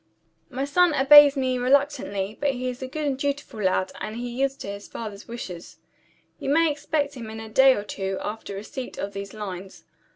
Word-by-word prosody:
"My 270 0 -2
son 340 +2 +3
obeys 285 +1 +8
me 255 -1 0
reluctantly; 255 -7 +1
but 285 -1 +2
he 255 0 -4
is 250 +1 -7
a 260 - -4
good 300 +3 -4
and 280 -2 0
dutiful 285 -6 -3
lad 185 -1 +1
and 215 - -4
he 245 +1 -4
yields 270 +2 0
to - - -9
his 200 0 -7
father's 210 -3 -8
wishes. 190 -8 -8 0.6
You - - -3
may 325 +2 +4
expect 290 0 -1
him 235 -5 -8
in 220 0 -7
a 220 - -7
day 265 +4 +6
or 205 - -4
two 195 -1 -4
after 210 -1 -5
receipt 250 +6 -7
of 200 0 -4
these 200 0 -7
lines. 190 -3 -7
250 Hz, 200 wpm, -25 LUFS, 205-280 Hz, 0.6 s, obeys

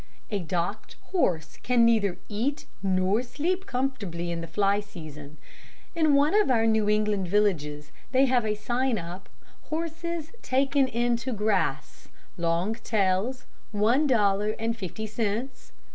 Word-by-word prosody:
"A 205 - 0
docked 180 +5 -3 0.2
horse 175 - 0
can 240 -2 +4
neither 215 -5 +3
eat 245 +8 -2 0.2
nor 190 +3 +2
sleep 350 +10 -2
comfortably 215 -10 -2
in 170 -1 -3
the 165 - -6
fly 200 +4 +2
season. 155 -7 -10 0.6
In 310 -3 +3
one 290 +4 +4
of 420 -7 +4
our 230 -3 +3
New 220 -2 +3
England 210 -3 +1
villages 160 -7 0 0.2
they 265 +1 +5
have 250 -2 +2
a 215 -1 0
sign 240 +3 0
up, 175 +1 -7 0.4
'Horses 330 0 -4
taken 270 +1 +2
in 240 0 +1
to 235 +3 -4
grass. 195 -10 -1 0.3
Long 170 +4 0
tails, 220 +2 0 0.3
one 230 +8 +3
dollar 210 -3 +2
and 225 +1 -1
fifty 220 0 -5
cents. 220 +4 -3
215 Hz, 140 wpm, -27 LUFS, 190-255 Hz, 0.6 s, they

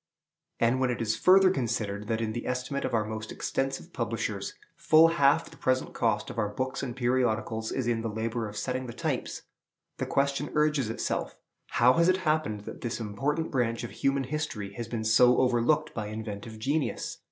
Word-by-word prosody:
And 120 +3 +3
when 130 -1 +2
it 120 - -2
is 110 -1 0
further 185 +4 +6
considered 110 - -2
that 115 -1 -1
in 110 -1 -2
the 120 - -4
estimate 125 +2 -2
of - - -3
our 110 -1 +1
most 110 0 -5
extensive 135 +6 -3
publishers 115 -4 -3 0.2
full 160 +1 +6
half 165 -1 +3
the - - -14
present 130 0 0
cost 105 -2 0
of - - -5
our 105 - +1
books 130 +5 -3
and 125 -3 -4
periodicals 120 -3 0
is 130 - -1
in 115 -1 0
the 115 - -2
labor 110 +1 -2
of 105 - -9
setting 130 +3 -2
the 120 - -6
types, - - -3 0.6
the - - -2
question 140 +1 0
urges 150 -5 +2
itself, 115 - -2 0.3
How 125 +2 +4
has 170 +5 +4
it 185 - +4
happened 155 -10 +1
that - - -9
this 120 -1 -3
important 135 +10 -2
branch 120 -3 0
of 120 - -5
human 135 0 0
industry 130 -8 -4
has 120 0 -5
been 115 -1 -3
so 120 +3 +5
overlooked 125 +3 +2
by 110 -2 -4
inventive 110 0 -6
genius? 140 +7 -2
120 Hz, 190 wpm, -28 LUFS, 110-140 Hz, 0.6 s, further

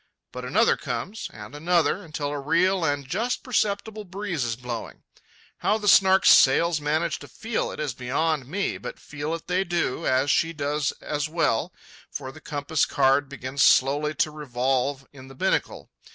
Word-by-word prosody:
But 125 - -7
another 210 - +3
comes, 140 - -5
and 105 +3 -11
another, 170 +5 +1
until 155 -3 -4
a 145 0 -3
real 170 +6 +2
and 145 -3 -1
just 225 - -2
perceptible 215 -3 -1
breeze 185 -5 -4
is 115 -1 -2
blowing. 120 -2 -7 0.5
How 210 - +1
the 210 -1 -5
Snark's 190 -1 +6
sails 160 +4 +5
manage 155 +3 0
to - - -11
feel 225 0 -3
it - - -8
is 150 -5 -2
beyond 135 +3 -1
me, 195 +7 -2
but - - -7
feel 150 +2 -5
it 165 - -9
they 180 +1 +1
do, 175 -7 -1
as 130 +2 +2
she 165 +1 +1
does 150 0 -1
as 150 +1 -2
well, 160 -9 0 0.4
for 130 - -6
the 155 - -14
compass 145 +1 -1
card 135 +1 +2
begins 140 0 -4
slowly 145 +4 +4
to 155 - +1
revolve 135 -1 -1
in 130 -2 -12
the 135 - -13
binnacle. - - -1
150 Hz, 170 wpm, -25 LUFS, 135-175 Hz, 0.5 s, Snark's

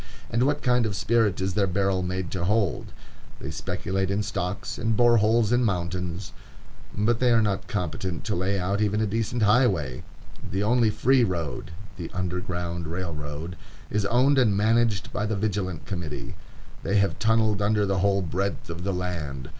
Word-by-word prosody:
And 120 +3 +2
what 145 0 0
kind 125 -3 +3
of 100 - -3
spirit 110 -2 +2
is 95 0 -1
their 100 0 +2
barrel 95 0 +1
made 90 -1 -3
to 90 -2 -2
hold? 100 -3 +1 0.5
They - - -5
speculate 95 0 -2
in 100 +2 0
stocks, 90 +1 -3
and 115 -1 0
bore 120 -1 +5
holes 110 +1 +3
in 120 +1 +3
mountains, 90 -2 -2 0.6
but 110 +3 +2
they 125 - +3
are 115 -1 +5
not 100 -2 -1
competent 95 -5 -3
to 105 -1 -1
lay 95 +3 0
out 100 +3 -1
even 105 0 +1
a 110 - +2
decent 115 +2 -1
highway. 100 - +2 0.5
The 95 +2 -1
only 115 +1 +3
free 125 +4 +3
road, 85 -8 -2 0.3
the 85 -3 -5
Underground 90 -2 -3
Railroad, 80 -1 -5 0.4
is 105 -1 +1
owned 130 +5 +4
and 105 -6 +3
managed 110 -1 +2
by 105 - -1
the 110 - -1
Vigilant 95 -5 -2
Committee. 85 -7 -5 0.5
They 100 - -1
have 100 0 +1
tunnelled 110 -2 +2
under 105 0 +2
the 95 -1 0
whole 100 0 +2
breadth 95 +1 -2
of 85 +1 -6
the 100 0 -1
land. 80 -8 -4
100 Hz, 175 wpm, -26 LUFS, 90-110 Hz, 0.6 s, bore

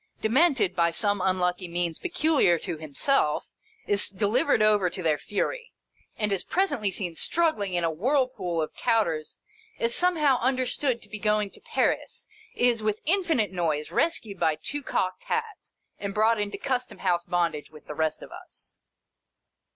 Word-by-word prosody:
Demented, 260 - +2
by 170 0 +3
some 205 +3 +1
unlucky 180 -1 0
means 170 -1 -2
peculiar 310 - +2
to 165 0 -5
himself, 155 - 0 0.3
is 205 0 +2
delivered 210 +3 +1
over 210 -4 +3
to 185 - -7
their 155 -3 +1
fury, 475 - -3 0.4
and 210 -1 -1
is 195 -2 0
presently 350 - 0
seen 185 -2 -1
struggling 210 - +1
in 175 - 0
a 165 - +1
whirlpool 210 - 0
of 155 - -7
Touters— 165 -9 0 0.4
is 230 0 0
somehow 305 -7 +2
understood 255 0 +1
to - - -14
be 215 - -7
going 210 -1 +1
to - - -17
Paris 465 -1 -1 0.2
— - - -23
is, 240 -2 +2
with 215 0 -1
infinite 325 - +1
noise, 160 -5 -2
rescued 225 - 0
by 155 - +2
two 290 - -4
cocked 185 -8 -2
hats, 455 -3 -4 0.3
and 200 -1 -5
brought 220 +1 +3
into 205 0 -3
Custom 255 -2 -3
House 175 -2 0
bond 175 -2 +1
age 150 -1 -8
with 155 -1 -15
the - - -7
rest 155 0 -1
of - - -12
us. - - -12
205 Hz, 165 wpm, -26 LUFS, 175-260 Hz, 0.4 s, by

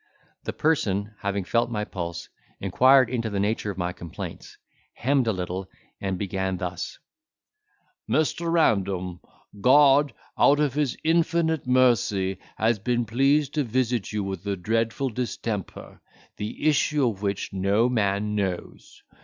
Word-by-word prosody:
The - - -2
person, 105 -10 0
having 100 0 -2
felt 115 +5 +1
my 105 -2 -2
pulse, 85 -4 -5 0.3
inquired 130 +7 +5
into 115 -2 -2
the 100 -1 -2
nature 105 +1 0
of 100 - -5
my 90 -1 -2
complaints, 85 -2 -8 0.4
hemmed 135 -1 +1
a - - +3
little, 90 0 -4 0.3
and 95 -2 -2
began 95 -1 -2
thus: 90 -1 -5 1.1
"Mr. 160 +3 +1
Random, 95 - +1 0.4
God 140 +2 +5 0.3
out 145 +1 +5
of 145 -4 +1
his 145 -4 -1
infinite 165 -2 +1
mercy 105 -7 +2 0.2
has 110 0 +2
been 120 +2 0
pleased 135 +5 +2
to 150 - +1
visit 120 -2 -1
you 105 -1 -2
with 95 -2 -5
a 100 - 0
dreadful 115 +7 -1
distemper, 115 -4 -5 0.4
the 105 +8 -3
issue 150 -2 +3
of 100 -4 -3
which 100 -1 -2
no 100 +5 +2
man 105 -3 0
knows. 95 -4 -4
110 Hz, 135 wpm, -25 LUFS, 95-130 Hz, 1.1 s, inquired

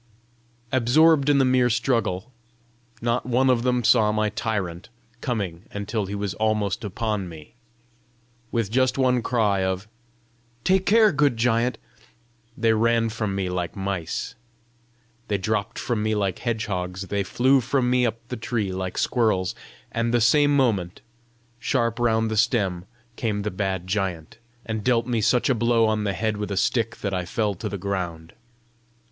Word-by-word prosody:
Absorbed 140 +4 +4
in 145 - +4
the 135 - +4
merry 125 -1 +3
struggle, 115 -4 0 0.7
not 120 +1 +1
one 130 +2 +3
of 120 -2 +2
them 125 0 +1
saw 110 -2 +4
my 110 0 +1
tyrant 105 -4 -3 0.3
coming 100 -8 -3
until 105 0 -3
he 100 - -4
was 100 -2 -3
almost 110 -2 0
upon 105 -2 -2
me. 80 +1 -12 1.0
With 115 -4 -1
just 130 +2 +2
one 125 -2 +2
cry 105 -6 +1
of 95 +2 -2 0.8
"Take 190 +3 +2
care, 215 0 +6
good 145 -5 +2
giant!" 120 +1 +1 0.8
they 115 -1 +3
ran 115 +1 +2
from 110 -3 -3
me 95 -1 -1
like 90 -1 -3
mice, 95 +4 -3 0.9
they 100 - 0
dropped 110 +3 -2
from 115 -3 -1
me 110 0 0
like 100 -3 -1
hedgehogs, 95 -6 -3
they 100 0 0
flew 130 +6 +3
from 130 +1 0
me 125 0 +3
up 115 0 -2
the 125 - -4
tree 110 -3 -2
like 95 -1 -4
squirrels, 105 -7 +1 0.4
and 115 0 -1
the 120 - +3
same 145 +5 +4
moment, 100 -10 0 0.6
sharp 115 -2 0
round 110 -2 +1
the 110 - -1
stem 100 -6 +1 0.3
came 105 -3 -1
the 105 - -2
bad 95 -2 -2
giant, 90 -1 -3 0.3
and 110 -2 -3
dealt 120 -1 +2
me 120 -2 0
such 115 +3 +2
a 135 - +3
blow 115 0 +2
on 110 -1 0
the 100 - 0
head 110 +1 -1
with 105 0 -4
a 100 - -3
stick 115 +3 +1
that 100 -2 -2
I 90 -1 -1
fell 105 +4 -1
to 105 +3 -5
the 100 - -4
ground. 90 -4 -4
110 Hz, 165 wpm, -24 LUFS, 100-120 Hz, 1.0 s, care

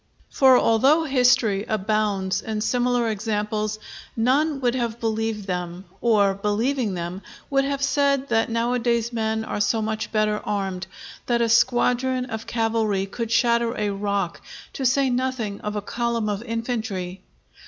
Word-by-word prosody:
For 260 -2 +6
although 270 +10 +4
history 250 -7 +3
abounds 210 -2 0
in 215 -1 -3
similar 245 +1 +1
examples, 215 0 -2 0.4
none 275 +6 +2
would 245 -2 +2
have 235 -2 -2
believed 225 -2 -2
them, 180 0 -4 0.2
or, 205 -4 +3
believing 210 +3 -1
them, 175 +2 -5 0.3
would 275 0 +3
have 280 0 -2
said 280 -1 +2
that 225 -1 +2
nowadays 235 0 0
men 220 -1 -1
are 205 - -3
so 220 +2 +2
much 220 0 -3
better 215 -1 +1
armed, 195 -3 -3 0.4
that 240 -1 +2
a 235 - +2
squadron 250 +2 +2
of 220 -3 -6
cavalry 225 -4 0
could 230 +3 -5
shatter 235 -1 +2
a 210 -1 0
rock, 200 -3 -2 0.3
to 265 - 0
say 265 +1 +2
nothing 245 -5 -2
of 210 0 -4
a 205 - -3
column 235 -1 -1
of 205 0 -2
infantry. 225 -6 -4
225 Hz, 145 wpm, -23 LUFS, 210-245 Hz, 0.4 s, For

